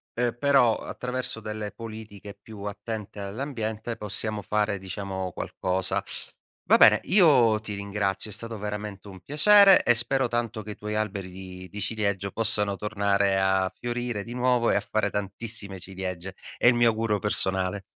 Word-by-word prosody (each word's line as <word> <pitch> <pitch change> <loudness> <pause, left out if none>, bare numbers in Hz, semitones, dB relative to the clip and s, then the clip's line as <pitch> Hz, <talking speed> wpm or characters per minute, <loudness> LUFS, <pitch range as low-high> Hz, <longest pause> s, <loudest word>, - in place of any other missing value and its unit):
ehm, 120 0 -1
però, 135 -4 +4
attraverso 125 -2 -4
delle 105 -1 -5
politiche 110 -3 -9
più 105 -3 -11
attente 105 0 -6
all'ambiente, 110 0 -4
possiamo 105 +1 -3
fare, 105 +1 0
diciamo, 95 -1 -5
qualcosa. 95 +1 -1 0.6
Va - - +6
bene, - - +7
io 140 - +5
ti 105 -1 -6
ringrazio, 100 0 -2
è - - +1
stato 115 -1 -4
veramente 105 -1 -6
un 95 -2 -11
piacere. 195 +6 +6
E 120 - +5
spero 130 +3 +3
tanto 120 -2 -2
che 105 - -7
i - - -7
tuoi 105 0 -5
alberi 100 -3 -3
di 90 0 -9
di 105 - -8
ciliegio 100 -2 -1
possano 105 -3 +1
tornare 100 -2 +1
a 95 -1 +2
fiorire 120 -3 -3
di 120 - -7
nuovo 125 -1 +2
e - - +2
a - - +2
fare 110 -1 -1
tantissime 100 0 -2
ciliegie. 95 0 -6 0.2
È - - +3
il 120 - +7
mio 120 0 +4
augurio 110 -2 0
personale. 95 -1 -1
105 Hz, 160 wpm, -26 LUFS, 100-115 Hz, 0.6 s, bene